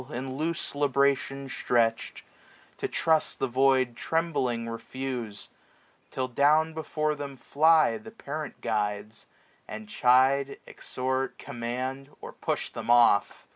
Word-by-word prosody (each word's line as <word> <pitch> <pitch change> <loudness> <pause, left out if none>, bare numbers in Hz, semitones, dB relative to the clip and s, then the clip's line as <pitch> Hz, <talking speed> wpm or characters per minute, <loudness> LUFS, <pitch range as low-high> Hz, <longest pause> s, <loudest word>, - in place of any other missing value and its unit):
In 130 +2 -5
loose 160 +3 -2
libration 140 -1 +1
stretch'd, 115 -3 0 0.5
to - - -2
trust 160 -1 +1
the - - 0
void 130 0 +3
740 120 - -10
Trembling 135 -8 0
refuse: 115 -2 -5 0.6
Till 130 -1 -2
down 150 +5 +3
before 155 -1 -1
them 140 -2 -7
fly 160 - +3
The 220 +1 -11
parent 155 -9 -7
guides, 105 -1 -3 0.4
and 110 0 -8
chide, 130 +4 +3
exhort, 130 +1 -3
command, 130 +3 -5
Or - - -9
push - - -3
them - - -7
off. 120 -4 +4
130 Hz, 120 wpm, -27 LUFS, 120-145 Hz, 0.6 s, off